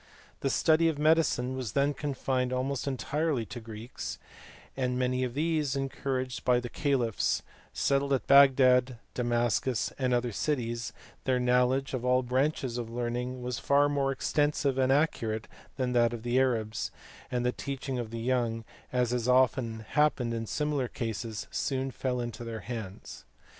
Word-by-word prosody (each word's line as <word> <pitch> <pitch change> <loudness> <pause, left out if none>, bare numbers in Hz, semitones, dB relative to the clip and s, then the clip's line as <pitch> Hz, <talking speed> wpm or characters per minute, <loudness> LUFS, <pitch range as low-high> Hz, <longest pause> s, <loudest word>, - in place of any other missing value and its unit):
The 135 - 0
study 160 +4 +4
of 155 - -2
medicine 150 -5 +2
was 125 -5 -4
then 140 +1 +2
confined 130 -3 -1
almost 130 +2 -1
entirely 140 -1 -1
to 120 - -7
Greeks, 110 +1 -7 0.6
and 125 -1 -1
many 125 0 +1
of 125 -1 -3
these, 150 -2 0
en 135 0 -1
couraged 130 -2 -3
by 125 -1 +4
the 120 0 -6
caliphs, 125 -7 0 0.3
settled 140 0 +1
at 130 - 0
Bagdad, 130 -2 +6 0.2
Damascus, 120 0 0
and 130 -1 +1
other 120 -1 +1
cities; 120 -2 -2 0.3
their 130 -1 +2
knowledge 125 +2 +2
of 125 -2 -2
all 125 0 +3
branches 130 -1 0
of 115 -2 -5
learning 125 +1 -3
was 125 -1 -3
far 140 +1 +4
more 140 -1 +1
extensive 145 0 +1
and 130 0 +3
accurate 115 -7 +1 0.3
than 125 -2 0
that 120 -1 +3
of 115 -2 -6
the 120 +1 +2
Arabs, 110 -4 0 0.4
and 125 -1 -1
the 125 - +3
teaching 135 -1 -4
of 115 -2 -4
the 115 0 -5
young, 115 -2 0 0.3
as 125 -2 +1
has 125 -1 -1
often 125 -3 +2
happened 145 -6 +2
in 115 -1 -3
similar 150 -2 -1
cases, 115 -2 -4
soon 135 -1 -1
fell 125 -1 -2
into 120 0 -5
their 115 -2 -5
hands. 105 -2 -7
125 Hz, 160 wpm, -29 LUFS, 120-135 Hz, 0.6 s, Bagdad